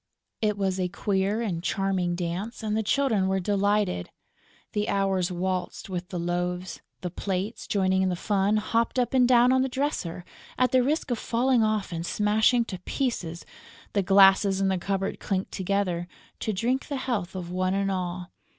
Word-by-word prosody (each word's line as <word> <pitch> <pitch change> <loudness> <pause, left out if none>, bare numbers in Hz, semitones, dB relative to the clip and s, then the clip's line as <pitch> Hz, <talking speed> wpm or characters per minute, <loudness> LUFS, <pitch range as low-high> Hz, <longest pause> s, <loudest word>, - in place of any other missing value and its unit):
It 210 -2 +1
was 190 -1 0
a 180 - +1
queer 200 +3 0
and 175 -7 -2
charming 190 -2 0
dance; 180 +7 -4
and 215 -1 -1
the 220 - +1
Children 220 -4 +1
were 190 0 +1
delighted. 200 - 0 0.6
The 210 0 -1
Hours 195 -2 +1
waltzed 185 +2 -3
with 180 -1 -4
the 180 - -4
loaves; 175 +1 -2 0.2
the 180 - -4
plates, 195 +5 -3
joining 190 -2 +2
in 190 - +2
the 180 - -1
fun, 200 +3 +1
hopped 230 +3 0
up 250 0 +1
and 255 -2 +5
down 245 0 +5
on 260 - +3
the 265 - 0
dresser, 245 - -2 0.3
at 255 0 +3
the 255 - +5
risk 290 +1 0
of 235 - 0
falling 245 +1 +2
off 215 -3 0
and 165 -1 -3
smashing 215 +5 +2
to 185 -5 -6
pieces; 180 - -3 0.5
the 200 - +2
glasses 195 0 +5
in 195 -1 +2
the 190 -1 0
cupboard 195 +1 -2
clinked 190 -1 -2
together, 185 -2 -1 0.3
to 220 - -1
drink 240 +7 -1
the 285 - -3
health 215 -9 -2
of 175 -2 -5
one 185 +1 0
and 195 0 0
all. 180 -1 -3
195 Hz, 180 wpm, -26 LUFS, 185-220 Hz, 0.6 s, and